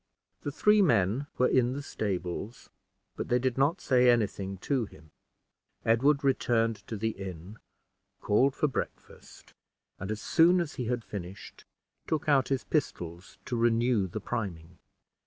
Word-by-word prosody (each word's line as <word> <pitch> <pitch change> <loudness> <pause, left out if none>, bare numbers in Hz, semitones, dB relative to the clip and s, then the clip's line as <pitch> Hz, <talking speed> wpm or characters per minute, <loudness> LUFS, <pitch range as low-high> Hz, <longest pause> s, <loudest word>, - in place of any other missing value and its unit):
The 145 - -3
three 210 +8 +4
men 115 - +2
were 125 - +4
in 125 -1 +2
the 140 +1 -5
stables, 100 0 -4 0.4
but - - -4
they 125 - +3
did 125 -1 0
not 145 +7 +2
say 125 -2 +4
any 120 -3 +5
thing 95 -1 -6
to 135 -5 0
him. 80 -6 -17 0.7
Edward 140 +6 +3
returned 115 -4 +2
to 110 - -4
the 110 +2 0
inn, 95 +1 -8 0.6
called 130 +6 +2
for 150 - +1
breakfast, 135 - -7 0.5
and 95 - -5
as 110 0 -3
soon 175 +8 +4
as 170 -3 -2
he 125 - -4
had 120 0 -2
finished, 100 0 -9 0.4
took 155 -2 -1
out 140 -3 +4
his 135 -2 -1
pistols 90 - -3
to 125 - -3
renew 115 -2 +2
the 100 +5 -5
priming. 90 -7 -5
120 Hz, 155 wpm, -29 LUFS, 100-135 Hz, 0.7 s, any